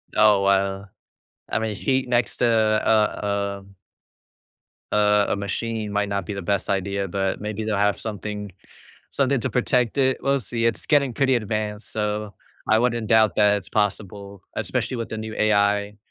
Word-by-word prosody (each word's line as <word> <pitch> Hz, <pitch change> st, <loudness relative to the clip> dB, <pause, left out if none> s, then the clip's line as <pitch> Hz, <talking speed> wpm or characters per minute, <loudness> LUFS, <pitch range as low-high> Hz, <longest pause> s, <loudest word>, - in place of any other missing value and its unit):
Oh 105 Hz, -2 st, +5 dB
wow, 100 Hz, 0 st, +1 dB, 0.6 s
I -, -, 0 dB
mean 110 Hz, -1 st, -2 dB
she 130 Hz, +4 st, 0 dB
next 120 Hz, -1 st, 0 dB
to -, -, +2 dB
uh, 105 Hz, -2 st, +1 dB
um 100 Hz, 0 st, -19 dB, 1.2 s
Uh, 105 Hz, 0 st, +3 dB
a -, -, +1 dB
machine 105 Hz, +2 st, -3 dB
might 105 Hz, 0 st, 0 dB
not 100 Hz, -2 st, -2 dB
be 100 Hz, -, -4 dB
the 100 Hz, -, -5 dB
best 100 Hz, +2 st, -1 dB
idea, 100 Hz, 0 st, -1 dB
but 95 Hz, +1 st, -2 dB
maybe 105 Hz, +1 st, -4 dB
they'll 110 Hz, -2 st, -1 dB
have 105 Hz, 0 st, +1 dB
something 105 Hz, -2 st, -5 dB, 0.6 s
something 140 Hz, -1 st, +1 dB
to -, -, -1 dB
protect 125 Hz, -1 st, +1 dB
it, 130 Hz, -1 st, +2 dB
we'll 140 Hz, 0 st, +2 dB
see, 115 Hz, -1 st, -2 dB
It's 115 Hz, -3 st, -1 dB
getting 140 Hz, -5 st, +2 dB
pretty 135 Hz, +1 st, +2 dB
advanced, 110 Hz, -2 st, -3 dB
so 105 Hz, -1 st, -2 dB, 0.3 s
I 110 Hz, -, +5 dB
wouldn't 120 Hz, -1 st, 0 dB
doubt 110 Hz, -1 st, +4 dB
that 105 Hz, -1 st, +4 dB
it's 100 Hz, -, -8 dB
possible, 100 Hz, -1 st, -3 dB
especially 125 Hz, -, -2 dB
with 115 Hz, -, -4 dB
the 110 Hz, -, -5 dB
new 110 Hz, 0 st, -6 dB
AI. 105 Hz, -1 st, +1 dB
105 Hz, 170 wpm, -23 LUFS, 100-115 Hz, 1.2 s, Oh